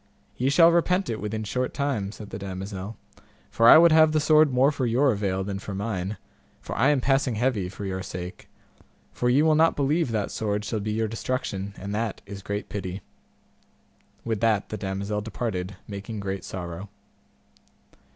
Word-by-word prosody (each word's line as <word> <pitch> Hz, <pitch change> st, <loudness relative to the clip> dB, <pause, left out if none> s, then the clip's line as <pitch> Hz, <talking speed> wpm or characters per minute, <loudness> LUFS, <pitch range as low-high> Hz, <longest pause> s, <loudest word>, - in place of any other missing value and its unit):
Ye 130 Hz, +2 st, +1 dB
shall 165 Hz, +4 st, +6 dB
repent 180 Hz, +1 st, +2 dB
it 110 Hz, -, -4 dB
within 110 Hz, +1 st, -3 dB
short 125 Hz, +5 st, -2 dB
time, 130 Hz, -9 st, -1 dB
said 105 Hz, -1 st, -10 dB
the -, -, -5 dB
damosel, 95 Hz, +2 st, -6 dB, 0.5 s
for 115 Hz, +1 st, +5 dB
I -, -, +11 dB
would 170 Hz, +1 st, +7 dB
have 155 Hz, 0 st, +6 dB
the 155 Hz, -, +3 dB
sword 155 Hz, -1 st, +5 dB
more 130 Hz, +3 st, +4 dB
for 135 Hz, -4 st, -1 dB
your 130 Hz, +4 st, +3 dB
avail 100 Hz, -3 st, -1 dB
than 95 Hz, 0 st, -4 dB
for 100 Hz, -1 st, -6 dB
mine, 100 Hz, -1 st, -3 dB, 0.4 s
for -, -, -7 dB
I 130 Hz, +6 st, +3 dB
am 145 Hz, -3 st, +2 dB
passing 135 Hz, -2 st, +1 dB
heavy 110 Hz, -5 st, 0 dB
for 100 Hz, +1 st, -7 dB
your 95 Hz, -1 st, -3 dB
sake; 90 Hz, 0 st, -7 dB, 0.6 s
for 125 Hz, -, 0 dB
ye 135 Hz, +5 st, +4 dB
will 160 Hz, 0 st, +4 dB
not 160 Hz, +2 st, +4 dB
believe 145 Hz, 0 st, +1 dB
that 105 Hz, -3 st, -1 dB
sword 105 Hz, -1 st, -2 dB
shall 110 Hz, -, -2 dB
be 105 Hz, +1 st, -3 dB
your 110 Hz, +1 st, 0 dB
destruction, 105 Hz, -4 st, -3 dB
and 100 Hz, +1 st, -5 dB
that 110 Hz, 0 st, -3 dB
is 100 Hz, -1 st, -8 dB
great 100 Hz, +2 st, -4 dB
pity. 95 Hz, -1 st, -5 dB, 1.2 s
With 110 Hz, -3 st, -1 dB
that 110 Hz, -3 st, +1 dB
the 110 Hz, -, -4 dB
damosel 100 Hz, +2 st, -3 dB
departed, 105 Hz, -4 st, -4 dB
making 100 Hz, +2 st, -6 dB
great 95 Hz, -2 st, -4 dB
sorrow. 90 Hz, +1 st, -6 dB
110 Hz, 180 wpm, -25 LUFS, 100-130 Hz, 1.2 s, I